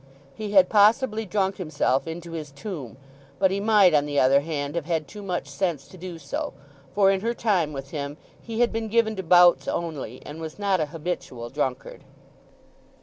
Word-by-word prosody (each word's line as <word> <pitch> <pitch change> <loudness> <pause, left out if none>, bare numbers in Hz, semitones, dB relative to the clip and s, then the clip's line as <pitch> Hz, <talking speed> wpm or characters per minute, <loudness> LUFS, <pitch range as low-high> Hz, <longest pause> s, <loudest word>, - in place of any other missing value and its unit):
He 210 -1 -6
had 190 -2 +7
possibly 220 +1 +3
drunk 195 0 0
himself 155 -5 0
into 170 +1 -6
his 155 -3 -6
tomb. 140 - -7 0.4
But 190 -1 +3
he 195 - -1
might, 205 -4 +5
on 145 -1 +3
the 145 -1 0
other 135 +2 +5
hand, 145 -2 -3
have 170 -3 -3
had 160 -3 -1
too 210 - -10
much 180 -3 -3
sense 170 -8 -2
to - - -14
do 180 -1 -7
so; 290 - -4 0.4
for 195 -1 +5
in 190 -1 0
her 235 +2 -1
time 185 -10 +1
with 135 -1 -7
him 145 -1 -5 0.2
he 230 0 -3
had 240 - +3
been 225 0 -3
given 220 0 +2
to - - -1
bouts 175 0 +5
only, 145 -8 -4
and 155 +2 -8
was 160 -1 -7
not 200 -2 +1
a 155 - 0
habitual 145 -7 -5
drunkard. 130 -3 -3
175 Hz, 195 wpm, -25 LUFS, 150-205 Hz, 0.4 s, had